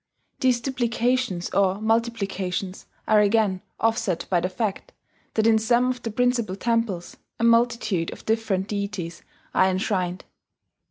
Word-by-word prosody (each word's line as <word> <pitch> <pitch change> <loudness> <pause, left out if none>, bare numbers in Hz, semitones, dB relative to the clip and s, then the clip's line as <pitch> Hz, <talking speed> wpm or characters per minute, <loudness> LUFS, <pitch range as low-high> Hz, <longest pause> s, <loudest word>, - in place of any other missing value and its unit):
These 250 -2 +2
duplications 245 -6 0
or 195 0 +2
multiplications 200 -4 -1 0.2
are 215 - +5
again 205 -3 +2 0.2
offset 225 -6 0
by 180 - +4
the 180 +2 -1
fact 195 +1 -3 0.4
that 220 - +2
in 225 -1 +5
some 240 +3 +2
of 250 - -6
the 230 - -3
principal 235 -3 0
temples 230 -5 -1 0.2
a - - -1
multitude 230 -6 +2
of - - -11
different 220 -4 0
deities 200 -5 -4 0.3
are 185 - +4
enshrined. 185 -1 -1
215 Hz, 130 wpm, -24 LUFS, 190-235 Hz, 0.4 s, are